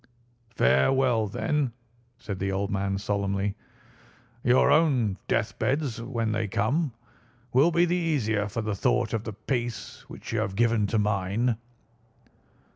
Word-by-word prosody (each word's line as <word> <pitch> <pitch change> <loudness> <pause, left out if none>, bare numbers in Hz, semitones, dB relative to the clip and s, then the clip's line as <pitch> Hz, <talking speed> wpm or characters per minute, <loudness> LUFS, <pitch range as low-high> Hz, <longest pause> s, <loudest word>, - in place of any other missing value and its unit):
"Farewell, 110 - +3
then," 140 +4 -1 0.4
said 100 -3 -6
the 95 0 -1
old 100 +1 -1
man 100 0 -1
solemnly. 100 0 -1 0.9
"Your 130 +3 +4
own 130 - +3
deathbeds, 135 -4 -1
when 115 -2 -2
they 110 0 -1
come, 130 - 0 0.6
will 135 +7 +5
be 170 +1 +3
the 175 +1 +1
easier 115 - 0
for 105 +3 -4
the 105 -1 -1
thought 110 +3 +1
of 110 -1 -2
the 110 - -4
peace 120 +2 -4
which - - -8
you 110 - +1
have 110 -3 -2
given 115 -1 +2
to 110 - 0
mine." 105 +3 +1
110 Hz, 135 wpm, -27 LUFS, 100-130 Hz, 0.9 s, will